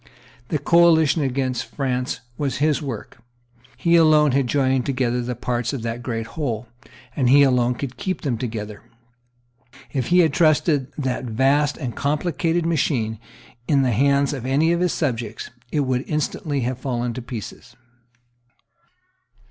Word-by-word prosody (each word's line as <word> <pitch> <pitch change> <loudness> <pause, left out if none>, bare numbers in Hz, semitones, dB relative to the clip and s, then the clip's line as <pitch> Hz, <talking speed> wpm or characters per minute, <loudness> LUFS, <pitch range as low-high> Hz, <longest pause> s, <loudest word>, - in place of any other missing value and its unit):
The 155 - 0
coalition 160 0 +4
against 130 -3 -1
France 130 -2 -2
was 140 0 -2
his 150 +1 +1
work. 130 -7 -7 0.6
He 170 -2 +3
alone 155 -3 +5
had 135 -1 +1
joined 130 -1 +1
together 125 -2 0
the 120 +1 -4
parts 120 +1 -2
of 130 -5 -4
that 115 +1 -4
great 115 -2 -3
whole; 120 -3 -4 0.5
and 130 -4 +2
he 140 +2 +7
alone 125 -2 +2
could 130 +1 -6
keep 185 -1 -3
them 135 -6 -1
together. 110 -4 -5 1.1
If 130 -4 -1
he 180 +1 +5
had 160 -4 +2
trusted 155 -4 +2
that 130 -3 -2
vast 135 +5 +1
and 125 -6 -5
complicated 165 +3 0
machine 130 -9 0 0.5
in 140 -2 +3
the 125 - +1
hands 140 +5 +2
of 135 -5 -5
any 140 +6 +2
of 170 - +1
his 180 0 +1
subjects, 120 -7 -3 0.2
it 150 - +1
would 130 -1 0
instantly 150 -1 -2
have 125 +1 -2
fallen 120 -2 -2
to 125 - -6
pieces. 115 -4 -8
135 Hz, 150 wpm, -22 LUFS, 120-150 Hz, 1.1 s, he